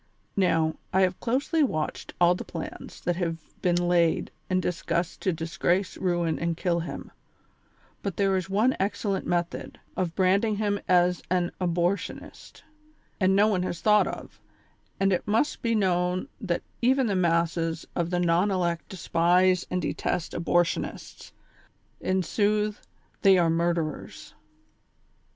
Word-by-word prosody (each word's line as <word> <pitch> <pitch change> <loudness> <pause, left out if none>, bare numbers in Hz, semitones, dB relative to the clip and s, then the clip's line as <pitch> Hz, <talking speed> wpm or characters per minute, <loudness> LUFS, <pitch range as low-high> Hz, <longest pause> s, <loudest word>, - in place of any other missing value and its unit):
Now, 165 -5 +2
I 190 - +3
have 185 -1 +1
closely 275 +7 0
watched 155 - -2
all 175 0 +6
the 180 - -5
plans - - -8
that 175 -1 -1
have 165 -3 -1 0.2
been 175 -1 +2
laid 170 -2 +2 0.2
and 185 0 +2
discussed 175 -1 -2
to 190 - +1
disgrace, 170 +3 -1
ruin 175 -3 0
and 170 -1 -1
kill 175 -1 0
him; 170 - -6 0.9
but 200 -3 -3
tliere 195 -1 +2
is 185 0 -2
one 215 +7 +2
excellent 200 0 -1
method, 175 -1 -2 0.2
of 175 -3 -2
branding 200 +3 +2
him 205 -1 0
as 180 -1 +3
an 180 -1 +1
abortionist, 175 +2 -2 0.6
that 190 -2 +3
no 200 +2 +5
one 195 -4 +1
has 175 -2 -3
thought 210 -1 +4
of; - - -8 0.6
and 195 0 +3
it 180 - -2
must 225 +8 +1
be 230 -1 +1
known 180 0 +1
that 180 -6 -2 0.2
even 260 +2 +3
the 205 -4 0
masses 170 -2 +1
of 170 -1 0
the 175 0 0
non 175 +3 +2
elect 175 -3 -1
despise 180 0 +2
and 180 0 -1
detest 170 - -2
abor 175 +1 +2
tionists; 170 - -6 0.7
in 185 0 0
sooth, 210 +2 0 0.4
they 195 -1 +6
are 170 -2 +3
murderers. 170 -2 -2
180 Hz, 145 wpm, -27 LUFS, 170-195 Hz, 0.9 s, all